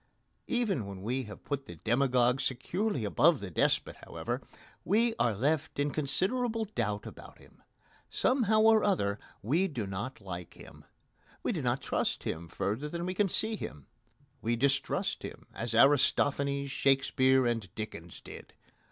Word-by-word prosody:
Even 210 - 0
when 95 -1 -8
we 125 +4 -1
have 105 -1 -11
put 140 -2 -4
the - - -8
demagogue 125 +1 +2
securely 175 - -1
above 150 - +4
the 100 -2 -7
despot, - - +1
however, - - -4 0.4
we 225 +7 +2
are 115 -3 +2
left 150 +7 0
in 145 0 +1
considerable 220 - +1
doubt 105 - -2
about - - -11
him. - - -20 0.5
Somehow 220 -5 +2
or 220 -1 +6
other 105 - +1 0.2
we 160 - +2
do 125 - -4
not 100 +7 -5
like 90 -4 -7
him. - - -14 0.6
We - - +1
do - - -2
not - - 0
trust - - -1
him 85 +1 -4
further 110 - -2
than 170 +2 -4
we 185 - -2
can 195 +1 +1
see 220 +5 0
him. 75 - -7 0.6
We 115 +2 0
distrust 135 +3 0
him - - -8
as 115 0 -3
Aristophanes, 140 +1 +3
Shakespeare, 130 -1 +3
and 115 -5 -1
Dickens 90 -6 -7
did. - - -11
135 Hz, 150 wpm, -31 LUFS, 110-180 Hz, 0.6 s, or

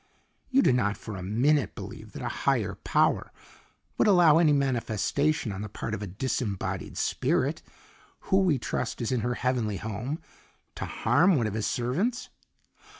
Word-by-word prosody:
"You 270 0 +4
do - - +4
not 105 -4 +1
for 110 - -7
a 95 - -6
minute 120 +5 +1
believe - - -9
that - - -7
a - - -2 0.2
higher - - +1
power - - +1 0.7
would - - +4
allow 175 -6 +6
any 160 -3 +5
manifestation 135 0 0
on 95 0 -5
the 105 - -5
part 105 - -5
of 105 - -3
a 105 - -4
disembodied 100 0 -3
spirit - - 0 0.6
who 190 - +2
we 175 -7 +3
trust 120 0 -3
is 115 - -2
in 125 - +1
her 120 +2 -1
heavenly 120 -6 -1
home 110 - -4 0.5
to - - -5
harm 175 +4 +3
one 120 -6 +1
of 110 - -2
His 110 -1 -1
servants?" 180 - -1
125 Hz, 165 wpm, -27 LUFS, 105-150 Hz, 0.7 s, allow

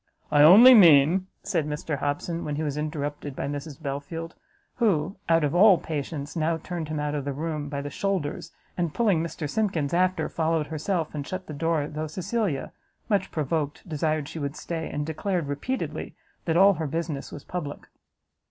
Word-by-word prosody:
"I 145 -1 +5
only 210 +12 +10
mean," 175 - +6 0.2
said 160 -5 -1
Mr 150 -1 -3
Hobson, 155 +4 -2
when 150 - -3
he 155 - -2
was 145 -2 -2
interrupted 145 -2 -4
by - - -3
Mrs 145 +1 -6
Belfield, 160 +3 -5 0.4
who, 195 -6 +1
out 165 -1 +4
of 145 - 0
all 190 +1 +7
patience, 150 -1 -5
now 165 0 +1
turned 170 -1 -5
him 155 -1 -2
out 150 0 -2
of 145 -2 -2
the 140 0 -3
room 150 0 -3
by 140 -1 -3
the 145 - -5
shoulders, 185 -4 -2 0.2
and, 170 -4 -2
pulling 205 -9 +2
Mr 165 -2 -4
Simkins 170 -5 -1
after, 180 -2 +2
followed 160 -1 0
herself, 160 +2 -2
and 145 -2 -5
shut 185 0 -5
the 155 - -7
door, 160 0 0
though 155 +1 -4
Cecilia, 185 - -2 0.4
much 200 -3 +1
provoked, 150 +1 -2
desired 155 -2 -1
she 165 - -7
would 140 -1 -3
stay, 165 -2 -4
and 150 0 -3
declared 170 +2 -2
repeatedly 145 - -4 0.3
that 165 -1 +1
all 195 +2 +7
her 160 -3 -3
business 160 -2 -4
was 145 - -8
public. 155 -5 -6
160 Hz, 180 wpm, -26 LUFS, 145-175 Hz, 0.4 s, only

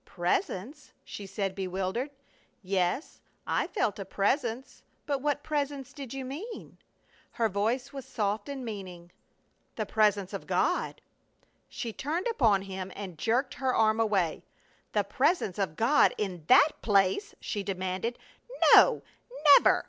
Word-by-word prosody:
"Presence?" 190 - -3
she 200 - -8
said, 195 -1 -2
bewildered. 190 +7 -2 0.5
"Yes, 185 - -1 0.2
I - - 0
felt 215 - -1
a - - -3
presence, 230 +6 -1 0.2
but 280 -2 -1
what 290 0 -1
presence 280 -3 -3
did 275 -5 -8
you 270 -1 -5
mean?" 345 - -8 0.5
Her 230 - +1
voice 225 +7 -1
was 275 -1 -6
soft 205 -2 -2
with 280 -1 -5
meaning. 190 -8 -7 0.6
"The 215 - -2
Presence 205 -2 +1
of - - -6
God." - - 0 0.7
She 230 -3 -5
turned 315 - -3
upon 225 - +3
him 190 -1 -6
and 195 -4 -7
jerked 250 - +1
her 260 -1 -1
arm 220 0 +3
away. 195 -7 +1 0.5
"The 205 - +2
Presence 210 - 0
of 190 -6 -1
God 240 - +4
in 180 -6 -4
that 305 - +5
place?" 200 - +2
she 210 - -3
demanded. 190 +4 -3 0.6
"No! - - +7 0.6
_Never! - - +4
215 Hz, 135 wpm, -29 LUFS, 195-270 Hz, 0.7 s, No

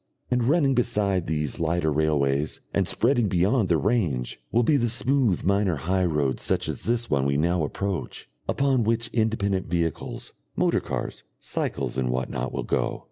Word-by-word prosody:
And 125 -1 +2
running 140 0 +3
beside 105 -7 0
these 75 -2 -2
lighter 85 -1 +1
railways, 75 -1 +1
and - - +1
spreading 120 -2 +2
beyond 95 +4 +2
their 85 - +4
range, 85 - -1
will 120 +2 +3
be 150 - +3
the 120 -4 +2
smooth 120 -4 +1
minor 100 -1 +2
high 90 +6 0
roads 75 -6 0
such - - 0
as - - -4
this 120 0 0
one 70 -2 +2
we 70 0 +1
now 85 +2 +1
approach, 95 +5 -4 0.2
upon 135 -3 +2
which 115 +1 0
independent 100 -4 0
vehicles, 85 -1 -3 0.2
motor - - +2
cars, - - -5 0.2
cycles, 65 - -3
and 65 -1 0
what 65 0 -2
not, 65 +1 -3
will - - -3
go. - - -1
95 Hz, 170 wpm, -25 LUFS, 75-115 Hz, 0.2 s, their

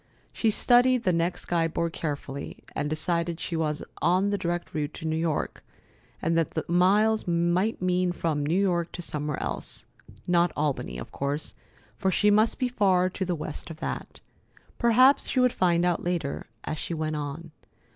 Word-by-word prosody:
She 225 - +1
studied 245 +3 +4
the 185 - +2
next 170 +2 -1
guide 165 -2 0
board 170 -1 0
carefully, 140 -3 -5
and 145 - -1
decided 170 +2 -1
that - - -19
she 170 - -3
was 155 -1 -1 0.2
on 185 +3 +3
the 205 - +1
direct 175 0 -3
route 150 -1 -3
to - - -7
New 160 0 0
York, 160 -1 -2 0.6
and 165 +1 +1
that 165 -2 0
the 160 - -1
miles 205 +5 +3
might 175 +5 +1
mean 180 0 +2
from 160 -4 -1
New 165 +6 +1
York 175 -4 +1
to 175 - -6
somewhere 150 -2 -3
else. - - -4 0.4
Not 175 0 +3
Albany, 140 - -1
of 60 - -8
course, 140 +2 -3 0.5
for 190 - +2
she 210 +3 +3
must 215 +2 +3
be 255 - +1
far 190 -6 +2
to 190 - -3
the 180 -1 -1
west 155 +1 -6
of 160 -1 -9
that. - - -5 0.6
Perhaps 255 +4 +5
she 260 - 0
would 250 -1 +4
find 175 -1 +2
out 175 -1 +1
later, 170 -5 -2 0.2
as 155 - -4
she 170 - -3
went 155 -1 -2
on. 150 +3 -5
170 Hz, 185 wpm, -27 LUFS, 155-190 Hz, 0.6 s, Perhaps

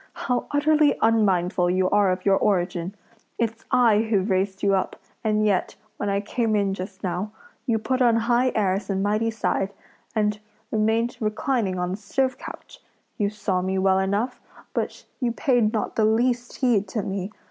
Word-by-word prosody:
how 250 -1 -2
utterly 295 0 +3
unmindful 190 -5 +2
you 185 +1 +2
are 205 -2 +4
of 185 0 -3
your 195 -1 +5
origin! 180 -1 0 0.4
It's 230 -1 -2
I 230 -4 +4
who've 215 -3 0
raised 190 +1 0
you 200 -1 +3
up, 190 -1 0 0.3
and 215 -1 +2
yet, 200 -3 +1 0.2
when 205 - -2
I 200 0 +1
came 210 -2 0
just 190 +1 -7
now, 185 +3 -2 0.4
you 230 -2 +2
put 255 +4 -1
on 235 -2 +5
high 240 +2 +2
airs 195 -1 0
and 195 0 0
mighty 215 +2 +1
side, 200 -3 -1 0.4
and 210 -1 +1 0.3
remained 225 +2 +1
reclining 215 -2 -1
on 180 0 -1
the 190 - -3
stove 260 +5 -1
couch! - - -10 0.4
You 205 -1 +2
saw 200 -3 -1
me 190 +1 -1
well 190 0 +3
enough, 205 +6 -1 0.3
but - - -3
you 245 -4 0
paid 240 -3 +2
not 220 - -2
the 220 - +3
least 240 +2 +1
heed 230 -6 +2
to 205 +2 -3
me! 195 +1 -4
210 Hz, 170 wpm, -24 LUFS, 190-230 Hz, 0.4 s, your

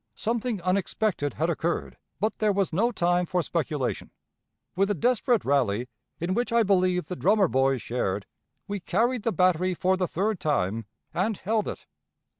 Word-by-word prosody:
Something 230 -1 -1
unexpected 185 -3 0
had 160 - 0
occurred, 170 +1 -2 0.2
but 215 +2 -1
there 215 -1 +3
was 195 -3 0
no 230 +8 +2
time 175 -3 +1
for 180 0 0
speculation. 150 -5 -2 0.7
With 195 +2 +2
a 205 - +1
desperate 245 - +2
rally, 125 -4 +1 0.3
in 175 +3 -1
which 240 +3 -1
I 230 0 +4
believe 185 -3 +2
the 180 - -5
drummer 200 +2 +3
boys 135 -4 +1
shared, 100 -5 -2 0.4
we 205 0 -3
carried 225 +7 0
the 230 - 0
battery 185 -1 +2
for 185 +2 +1
the 185 -1 0
third 200 +3 -1
time, 115 -7 0 0.3
and 200 +3 0
held 215 +1 -1
it. - - -6
185 Hz, 165 wpm, -26 LUFS, 155-215 Hz, 0.7 s, I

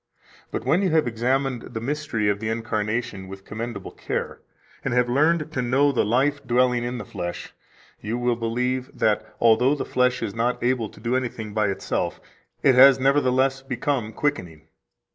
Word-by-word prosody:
But - - -4
when 160 +8 +3
you 190 - +2
have 160 -1 +3
examined 125 +2 0
the 115 - -6
mystery 130 -4 -2
of 100 0 +1
the 110 +1 -3
incarnation 110 -2 -2
with 95 0 -10
commendable 110 -2 -6
care, - - -4 0.4
and 120 - -1
have 125 0 +3
learned 155 +5 +2
to 140 -5 -1
know 135 +4 +3
the 130 - +1
life 140 +6 +1
dwelling 125 -1 +2
in 120 +1 -3
the 110 - -6
flesh, 85 -1 -6 0.5
you 110 +3 -3
will 120 0 +1
believe 125 +3 -2
that, 105 -1 +2 0.2
although 120 +5 +4
the 145 - -4
flesh 125 -1 +1
is 105 -3 -3
not 120 +3 -1
able 120 -3 +1
to - - -16
do 115 +3 -1
anything 115 -4 -3
by 105 -1 +1
itself, 95 - -2 0.4
it 135 - +6
has 135 +1 +8
nevertheless 135 -1 +2
become 130 -3 -2
quickening. 90 - -3
125 Hz, 175 wpm, -24 LUFS, 110-135 Hz, 0.5 s, has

